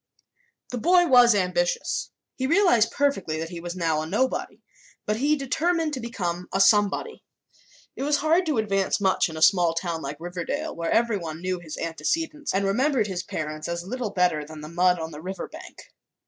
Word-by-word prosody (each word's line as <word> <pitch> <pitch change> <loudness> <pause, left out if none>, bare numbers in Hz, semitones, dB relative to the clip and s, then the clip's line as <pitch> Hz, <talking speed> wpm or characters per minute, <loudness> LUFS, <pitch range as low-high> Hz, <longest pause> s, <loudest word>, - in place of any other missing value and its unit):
The 245 - -3
boy 350 +8 +4
was 245 -6 +6
ambitious. 180 -2 0 0.3
He 260 - -2
realized 305 - +4
perfectly 230 - 0
that 165 +1 -4
he 175 - -6
was 175 +1 -6
now 165 -3 0
a 155 - -5
nobody, 255 +9 -1 0.4
but 210 - 0
he 290 +5 +2
determined 315 +4 0
to 265 - -3
become 180 -7 -4
a 195 - 0
somebody. 205 - +2 0.7
It - - -7
was 290 +1 +2
hard 325 +4 +2
to 300 -5 0
advance 195 -3 +1
much 190 -2 +2
in 160 - -8
a 155 - +1
small 175 -3 +4
town 165 -1 -2
like 140 0 -5
Riverdale, 180 - -4
where 170 0 -3
everyone 195 -9 0
knew 185 0 -2
his 160 -3 -8
antecedents 300 - -2
and 195 +1 0
remembered 250 +4 +2
his 185 -3 -3
parents 155 -6 -5
as 170 0 -3
little 245 +2 -3
better 180 -6 +1
than 155 +1 -10
the 150 - -8
mud 180 +2 +3
on 160 -1 -5
the 150 0 -9
river 190 +3 -5
bank. - - -13
195 Hz, 190 wpm, -25 LUFS, 170-260 Hz, 0.7 s, was